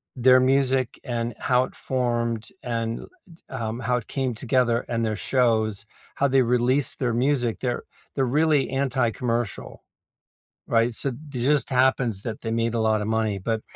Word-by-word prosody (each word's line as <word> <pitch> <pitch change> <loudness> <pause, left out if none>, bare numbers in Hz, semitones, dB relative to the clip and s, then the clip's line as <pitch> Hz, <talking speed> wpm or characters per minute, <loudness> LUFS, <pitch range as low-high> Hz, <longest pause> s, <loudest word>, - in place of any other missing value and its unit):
their 130 0 +6
music 130 -1 +1
and 120 -2 -2
how 125 0 +3
it - - -14
formed 120 -3 -1
and 115 -1 -2
l - - -9
t 180 - -19
um, 110 -1 -2
how 125 +1 +1
it 120 - -6
came 130 -3 -2
together 120 0 +1
and 115 -1 0
their 110 - -1
shows, 110 -3 +1 0.3
how 140 - +2
they 135 -1 +4
released 125 +3 +1
their 125 -3 0
music 125 -1 +1
they're 125 -2 -2 0.3
they're 135 - +2 0.2
really 155 -4 +3
anti-commercial, 125 -4 -1 0.8
right, 115 +1 +2
so 135 - -2 0.2
th 125 -3 -3
just 150 - +1
happens 125 -3 +2
that 110 -2 -4
they 115 - -3
made 115 0 0
a 115 - +1
lotta 110 -1 +1 0.2
money, 105 -3 -1
but 110 -1 0
120 Hz, 165 wpm, -24 LUFS, 115-130 Hz, 0.8 s, their